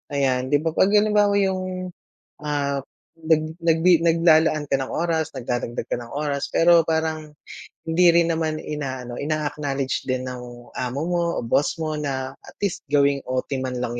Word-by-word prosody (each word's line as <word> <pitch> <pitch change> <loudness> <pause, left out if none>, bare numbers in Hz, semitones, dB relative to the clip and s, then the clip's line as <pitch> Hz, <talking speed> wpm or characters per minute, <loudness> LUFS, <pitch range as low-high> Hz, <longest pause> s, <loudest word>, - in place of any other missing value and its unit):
Ayan, 130 -2 +1
'di 145 +2 +1
ba 165 - 0
'pag 190 - +3
halimbawa 210 -1 +4
'yung, 185 -2 -1 0.5
ah, 140 -2 -1 0.3
nag 160 0 0
nagbi 165 +1 +4
naglalaan 160 -3 +3
ka 135 - +2
ng 135 -1 -4
oras 160 -2 -1
nagdadagdag 120 -2 -4
ka - - -1
ng 120 -1 -9
oras 145 -1 -2
pero 170 -1 +5
parang 160 -1 -2 0.5
hindi 170 +2 +3
rin 170 -1 +4
naman 160 -1 -1
inaano, 130 -6 -5
ina-acknowledge 145 -3 -2
din 130 0 -1
ng 125 -1 -8
amo 130 +3 -3
mo 175 0 0
o - - -3
boss 135 +5 +1
mo 155 -2 -3
na 135 -2 -3
at - - -15
least 195 -6 -2
gawing 140 -1 +3
OT 130 +2 -2
man 125 -1 -3
lang 120 0 -3
150 Hz, 165 wpm, -23 LUFS, 130-165 Hz, 0.5 s, pero